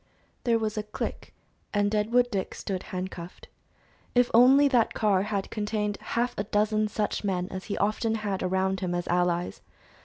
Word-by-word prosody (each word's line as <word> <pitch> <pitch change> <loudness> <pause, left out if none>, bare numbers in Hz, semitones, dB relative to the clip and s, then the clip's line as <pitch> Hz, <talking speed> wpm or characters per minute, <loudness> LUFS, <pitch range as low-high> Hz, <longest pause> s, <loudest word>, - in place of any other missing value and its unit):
There 235 -2 +4
was 215 -1 -2
a 210 0 -7
click, - - -5 0.4
and 205 0 +2
Deadwood 235 +4 +2
Dick 195 -3 -2
stood 190 -2 -4
handcuffed. 180 -2 -6 0.7
If 245 0 +4
only 265 +5 +7
that 245 -5 +2
car 205 -4 +3
had 200 -1 -3
contained 210 -1 -2
half 240 +1 -1
a - - +1
dozen 215 +1 +1
such 210 0 -2
men 185 -3 -1
as 185 0 -6
he 205 - -3
often 220 +2 +1
had 205 -3 -2
around 190 +1 0
him 180 -2 -2
as 175 -1 -3
allies! 175 0 0
210 Hz, 165 wpm, -27 LUFS, 190-220 Hz, 0.7 s, only